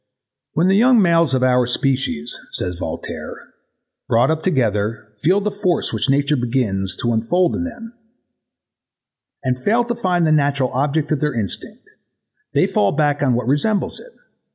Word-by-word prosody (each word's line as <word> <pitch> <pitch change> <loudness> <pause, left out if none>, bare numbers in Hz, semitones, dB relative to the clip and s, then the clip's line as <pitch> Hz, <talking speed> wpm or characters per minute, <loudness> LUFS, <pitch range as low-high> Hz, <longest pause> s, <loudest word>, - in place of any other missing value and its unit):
"When 165 - +2
the 190 - +4
young 245 +3 +5
males 165 -7 +3
of 130 - 0
our 125 -1 +3
species," 125 - -1 0.2
says 90 -1 -3
Voltaire, - - -6 0.7
"brought 115 +7 +3
up 160 0 -1
together, 110 - -1
feel 185 +6 +3
the 210 +1 -1
force 195 -3 -1
which - - 0
nature 140 +2 +2
begins 115 -7 -1
to. 120 0 +1
unfold 165 +11 +1
in 260 - -2
them, 235 -2 -9 1.5
and 130 -1 -1
fail 225 - +2
to 240 0 -2
find 180 -6 0
the 155 - +2
natural 140 -3 +1
object 145 +4 -1
of 155 - +1
their 150 -2 -1
instinct, 105 -5 -5 0.7
they - - +3
fall 100 - +1
back 145 -1 +1
on 130 -4 +2
what 120 -1 -2
resembles 150 - 0
it. - - -15
145 Hz, 160 wpm, -19 LUFS, 125-180 Hz, 1.5 s, young